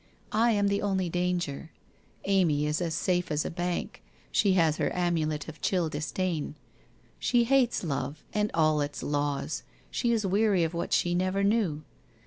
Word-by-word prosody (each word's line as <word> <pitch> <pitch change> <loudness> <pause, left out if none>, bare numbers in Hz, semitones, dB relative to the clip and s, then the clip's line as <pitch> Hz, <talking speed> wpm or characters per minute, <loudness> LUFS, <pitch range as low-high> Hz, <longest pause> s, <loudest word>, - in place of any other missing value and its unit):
I 225 +3 +3
am 205 -1 +2
the 200 0 +1
only 190 -3 0
danger. 175 -4 -1 0.6
Amy 175 -7 +2
is 150 +3 -1
as 165 -2 -1
safe 180 -2 0
as 150 0 0
a - - -3
bank, 175 +1 -3 0.3
she 200 -3 +3
has 165 -4 +3
her - - +1
amulet 160 -4 0
of 155 -2 -10
chill 175 -4 +1
disdain. 155 +1 -2 0.6
She 240 -1 +3
hates 255 -2 +2
Love, 140 -1 -3
and 210 -1 +1
all 155 -2 +3
its 145 0 -4
laws, 145 -1 -1 0.3
she 240 - 0
is 220 -3 +1
weary 195 -1 +3
of 165 +1 -1
what 170 - -3
she 175 - +2
never 185 +2 +1
knew. 200 -8 +1
175 Hz, 165 wpm, -28 LUFS, 155-200 Hz, 0.6 s, I